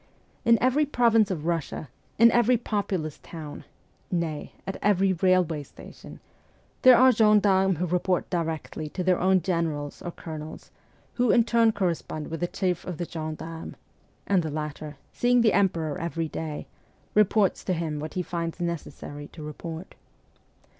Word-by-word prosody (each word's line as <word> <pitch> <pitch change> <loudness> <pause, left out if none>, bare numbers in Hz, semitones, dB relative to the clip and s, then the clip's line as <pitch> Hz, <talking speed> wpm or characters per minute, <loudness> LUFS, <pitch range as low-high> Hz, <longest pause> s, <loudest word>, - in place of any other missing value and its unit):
In 230 0 +6
every 275 +4 +3
province 230 -5 +3
of 165 -5 -3
Russia, 165 -2 -2 0.3
in 230 +1 +7
every 240 +1 +4
populous 195 - -3
town, 155 -3 -9 0.4
nay, 165 -4 -2
at 195 - -4
every 195 -2 +3
railway 180 -3 +2
station, 145 - -13 0.6
there 255 -2 +8
are 260 +1 +7
gendarmes 205 -5 +4
who 180 - 0
report 180 +1 0
directly 160 -2 -3
to 180 - -4
their 180 -1 +2
own 185 -1 +3
generals 160 -5 -2
or 175 - -5
colonels, 155 -2 -8 0.4
who 245 -1 +1
in 235 0 +5
turn 230 -1 +3
correspond 170 -6 -3
with 165 - -4
the 175 - 0
chief 180 -2 -1
of 180 -3 -6
the 175 - -3
gen 155 -1 -5
darmes; 165 0 -8 0.5
and 195 -3 +3
the 160 - -3
latter, 150 -1 -5 0.2
seeing 245 0 +3
the 220 -3 +4
Emperor 165 -7 +1
every 165 -1 -2
day, 155 -1 -5 0.5
reports 210 -1 +3
to 185 - 0
him 160 -3 -2
what 155 +1 -6
he 180 - -1
finds 170 0 -4
necessary 145 -3 -5
to 155 - -11
report. 160 +3 -7
175 Hz, 155 wpm, -26 LUFS, 160-205 Hz, 0.6 s, there